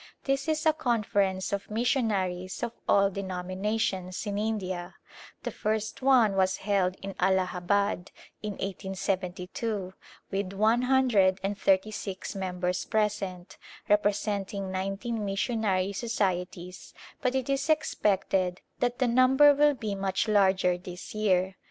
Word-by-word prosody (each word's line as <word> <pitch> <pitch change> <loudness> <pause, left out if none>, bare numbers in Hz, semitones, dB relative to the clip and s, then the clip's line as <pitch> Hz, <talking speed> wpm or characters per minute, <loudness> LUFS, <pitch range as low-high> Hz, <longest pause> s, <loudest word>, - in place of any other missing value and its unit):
This 275 +1 0
is 310 0 0
a 315 - +5
conference 205 - 0
of 200 0 -3
missionaries 210 -6 -1
of 235 - -1 0.2
all 200 0 +4
denominations 190 0 -2
in 205 -1 -2
India; 190 -5 -3 0.5
the - - -3
first 220 +2 -2
one 250 -6 +4
was 190 0 +2
held 190 -3 +2
in 195 0 -5
Allahabad, 190 +1 +1 0.3
in 210 -1 -3
1872, 190 +1 -3 0.4
with 195 -1 -2
one 220 +4 +3
hundred 245 -8 +3
and 200 +1 -1
thirty 195 +1 +2
six 195 -2 -5
members 180 -2 -2
present, 200 -4 -2 0.3
representing 205 -1 0
nineteen 195 +4 -3
missionary 200 -1 0
societies, 185 -5 -3 0.3
but 255 -1 0
it 260 -2 -1
is 275 +2 -1
expected 195 - +1 0.2
that 245 0 0
the 255 - +2
number 260 +4 +6
will 290 0 +4
be 220 -5 -3
much 195 +1 -1
larger 190 -3 +3
this 180 0 -9
year. 190 -3 +1
200 Hz, 125 wpm, -28 LUFS, 185-225 Hz, 0.5 s, number